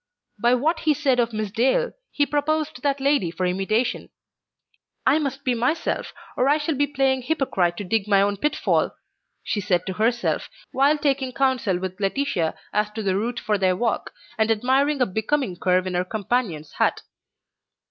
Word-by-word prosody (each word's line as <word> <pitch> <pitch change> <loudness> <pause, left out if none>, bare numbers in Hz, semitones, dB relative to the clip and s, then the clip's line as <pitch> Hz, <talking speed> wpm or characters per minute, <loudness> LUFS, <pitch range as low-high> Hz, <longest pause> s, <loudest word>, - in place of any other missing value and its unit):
By 240 +2 +4
what 315 +6 +1
he 305 -1 +2
said 265 -3 +1
of 235 -1 +2
Miss 215 -2 -3
Dale, 265 - +2 0.2
he 290 - +1
proposed 310 +2 -1
that 280 -1 0
lady 275 - +2
for 180 +2 -3
imitation. 195 +6 0 1.0
"I 280 +4 +4
must 275 -2 -3
be 255 - +1
myself 250 +8 -1 0.2
or 255 +2 +2
I 295 - +4
shall 310 +1 -1
be 285 +1 +1
playing 270 -2 +1
hypocrite 240 - 0
to - - -4
dig 205 +2 0
my 200 -2 +4
own 200 0 0
pitfall," 300 +9 0 0.5
she 205 - -2
said 180 -2 0
to 190 - -3
herself, 230 +5 0 0.2
while 280 +3 +3
taking 275 -3 0
counsel 255 -9 +1
with 185 +1 -5
Laetitia 195 - 0 0.2
as 210 0 +1
to 220 0 -4
the 190 -2 +1
route 235 +4 -1
for 210 -1 0
their 185 -1 +2
walk, 230 +4 -1 0.3
and 220 0 +3
admiring 265 +6 +2
a - - +5
becoming 220 +1 -1
curve 185 +1 +1
in 185 - -3
her 180 0 +1
companion's 200 -5 -2
hat. - - +1
240 Hz, 180 wpm, -23 LUFS, 195-280 Hz, 1.0 s, a